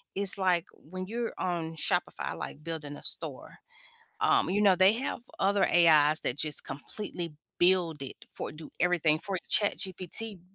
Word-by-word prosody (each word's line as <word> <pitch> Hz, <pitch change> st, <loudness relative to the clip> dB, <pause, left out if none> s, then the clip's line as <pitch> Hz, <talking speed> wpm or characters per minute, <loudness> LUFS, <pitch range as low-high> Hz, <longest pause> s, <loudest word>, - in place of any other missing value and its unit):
is 200 Hz, 0 st, +3 dB
like 180 Hz, -3 st, +2 dB
when 185 Hz, +4 st, -8 dB
you're 230 Hz, +1 st, -3 dB
on 165 Hz, -3 st, -2 dB
Shopify, 160 Hz, -, -1 dB
like 150 Hz, -, -7 dB
building 155 Hz, -3 st, -6 dB
a -, -, -13 dB
store, -, -, -4 dB, 0.6 s
um, 400 Hz, -2 st, +3 dB
you 205 Hz, +2 st, +1 dB
know, 195 Hz, -3 st, +6 dB
they 190 Hz, +3 st, +5 dB
have 255 Hz, +3 st, -3 dB, 0.2 s
other 200 Hz, +1 st, +3 dB
AIs 155 Hz, -3 st, +5 dB
that 130 Hz, -, -2 dB
just 150 Hz, -2 st, +3 dB
completely 170 Hz, +1 st, -6 dB, 0.3 s
build 175 Hz, -4 st, +3 dB
it 135 Hz, -, -6 dB, 0.2 s
for -, -, -5 dB
do 155 Hz, +1 st, -11 dB
everything 165 Hz, -3 st, +2 dB
for 195 Hz, +1 st, -3 dB
ChatGPT 195 Hz, 0 st, 0 dB
180 Hz, 155 wpm, -29 LUFS, 160-200 Hz, 0.6 s, know